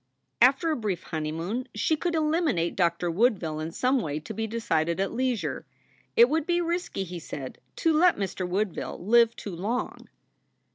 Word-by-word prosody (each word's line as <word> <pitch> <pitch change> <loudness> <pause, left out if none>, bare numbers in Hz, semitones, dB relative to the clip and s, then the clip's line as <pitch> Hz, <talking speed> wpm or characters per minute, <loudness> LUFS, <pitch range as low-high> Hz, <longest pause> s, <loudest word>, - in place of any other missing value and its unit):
After 270 +6 +5
a - - +1
brief 200 - -3
honeymoon 165 +10 -3
she 265 +9 +2
could 340 +2 -2
eliminate 305 - +1
Doctor 170 -1 +1
Woodville 180 -6 +1
in 160 +1 -4
some 255 +7 +1
way 150 -4 -3
to - - -7
be 225 0 -2
decided 170 -7 0
at 195 - 0
leisure. 250 -2 -2 0.5
It 470 +1 +8
would 315 -1 0
be 345 0 +2
risky, 345 - -2
he 180 -1 -7
said, 140 -4 -7 0.2
to 325 - +2
let 345 +3 +4
Mr. 190 -2 -3
Woodville 195 0 -2
live 235 +1 +5
too 195 -4 -7
long. 215 +8 -3
215 Hz, 165 wpm, -27 LUFS, 170-280 Hz, 0.5 s, It